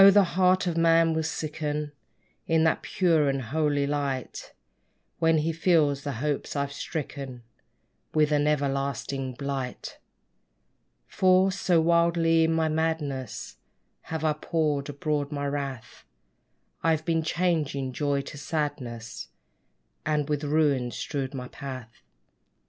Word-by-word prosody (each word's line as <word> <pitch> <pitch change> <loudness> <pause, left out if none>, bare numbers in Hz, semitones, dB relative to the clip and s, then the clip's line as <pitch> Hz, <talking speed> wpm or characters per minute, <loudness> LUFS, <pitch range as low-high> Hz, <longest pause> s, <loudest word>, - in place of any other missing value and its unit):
the 200 +1 +6
heart 185 +1 +3
of 175 -2 -1
man 165 0 +4
will 160 - 0
sicken 150 -1 -3 0.6
In 160 -1 +3
that 160 - +2
pure 165 -6 +2
and 135 0 0
holy 145 +3 0
light, 140 -3 -3 0.7
When 165 0 +4
he 155 +2 +1
feels 155 -4 +3
the 140 - -3
hopes 145 +6 -2
I've 140 0 -1
stricken 140 -5 -5 0.7
With 155 -1 +3
an 145 0 +3
everlasting 140 -2 -1
blight! 135 -2 -4 1.1
For, 185 - +4
so 185 -2 +2
wildly 170 0 +3
in 160 - +1
my 160 -1 +2
madness 155 -6 -2 0.5
Have 160 -1 -3
I 155 -1 +3
poured 150 -2 -1
abroad 145 0 -2
my 145 -1 -2
wrath, 140 -4 -4 0.8
I've 160 -1 +1
been 165 -1 +1
changing 155 -6 0
joy 140 0 0
to 140 +1 -9
sadness; 130 -8 -4 0.8
And 150 -2 0
with 150 -1 -1
ruins 145 -5 +1
strewed 135 -2 -3
my 125 -1 -5
path. 130 -4 -8
150 Hz, 125 wpm, -27 LUFS, 140-160 Hz, 1.1 s, the